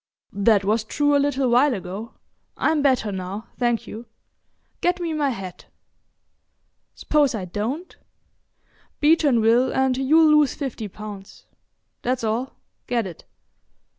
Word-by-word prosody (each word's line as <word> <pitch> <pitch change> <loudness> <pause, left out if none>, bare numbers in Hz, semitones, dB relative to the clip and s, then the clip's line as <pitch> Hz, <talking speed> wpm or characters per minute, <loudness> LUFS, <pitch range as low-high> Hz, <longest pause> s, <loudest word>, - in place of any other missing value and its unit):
"That 200 0 +3
was 215 +2 +1
true 290 +6 +1
a - - +4
little 275 -2 0
while 255 +2 +4
ago. 195 +4 -7 0.4
I'm 315 -1 +1
better 255 -7 +2
now, 190 +4 -6
thank 240 -2 0
you. 230 +3 -9 0.7
Get 355 +1 +1
me 335 -2 -2
my 295 -2 0
hat." 195 -7 -7 1.3
"S'pose 290 -5 +1
I 195 -4 -4
don't?" 230 - -4 1.0
"Beeton 295 -5 +4
will, 235 +4 +3
and 265 -1 +1
you'll 305 +3 +5
lose 290 -3 +1
fifty 255 -6 -5
pounds. 205 -1 -10 0.6
That's 250 -1 -1
all. 230 +4 -2 0.3
Get 235 -3 0
it." 175 -4 -10
245 Hz, 130 wpm, -23 LUFS, 215-285 Hz, 1.3 s, you'll